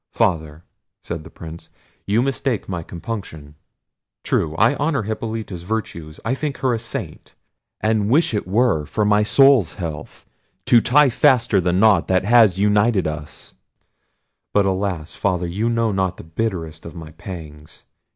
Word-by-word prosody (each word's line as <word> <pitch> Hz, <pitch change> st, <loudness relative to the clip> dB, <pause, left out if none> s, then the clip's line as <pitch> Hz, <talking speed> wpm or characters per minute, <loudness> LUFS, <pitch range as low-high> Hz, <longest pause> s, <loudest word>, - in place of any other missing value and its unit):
"Father," 80 Hz, -2 st, -1 dB, 0.4 s
said 85 Hz, -2 st, -5 dB
the 80 Hz, -, -12 dB
Prince, 80 Hz, 0 st, -10 dB, 0.4 s
"you 110 Hz, +4 st, +2 dB
mistake 135 Hz, -4 st, -1 dB
my 90 Hz, -3 st, -3 dB
compunction: 85 Hz, -5 st, -7 dB, 0.7 s
true, 75 Hz, -1 st, 0 dB
I 110 Hz, +9 st, +4 dB
honour 145 Hz, -5 st, 0 dB
Hippolita's 110 Hz, -3 st, -5 dB
virtues; 85 Hz, -6 st, -5 dB
I 115 Hz, -, +1 dB
think 140 Hz, +1 st, -3 dB
her 130 Hz, -2 st, 0 dB
a 115 Hz, -, -1 dB
Saint; 115 Hz, -, -7 dB, 0.5 s
and 105 Hz, -1 st, +1 dB
wish 145 Hz, +1 st, +3 dB
it 105 Hz, -4 st, -2 dB
were 100 Hz, -, +1 dB
for 105 Hz, -, -1 dB
my 105 Hz, 0 st, +4 dB
soul's 130 Hz, -, +4 dB
health 80 Hz, -5 st, -7 dB, 0.4 s
to 120 Hz, -, +5 dB
tie 145 Hz, +4 st, +4 dB
faster 120 Hz, -7 st, +3 dB
the 90 Hz, 0 st, +1 dB
knot 95 Hz, -1 st, +4 dB
that 95 Hz, 0 st, +1 dB
has 110 Hz, -5 st, +5 dB
united 105 Hz, +1 st, +2 dB
us—but 75 Hz, +5 st, -6 dB
alas! 95 Hz, -5 st, -2 dB
Father, 90 Hz, -2 st, -1 dB
you 100 Hz, +7 st, -1 dB
know 115 Hz, -1 st, +1 dB
not 95 Hz, -2 st, -1 dB
the -, -, -10 dB
bitterest 80 Hz, -2 st, -4 dB
of 85 Hz, -, -10 dB
my 80 Hz, -2 st, -9 dB
pangs! 75 Hz, -3 st, -10 dB
100 Hz, 150 wpm, -21 LUFS, 85-115 Hz, 0.7 s, to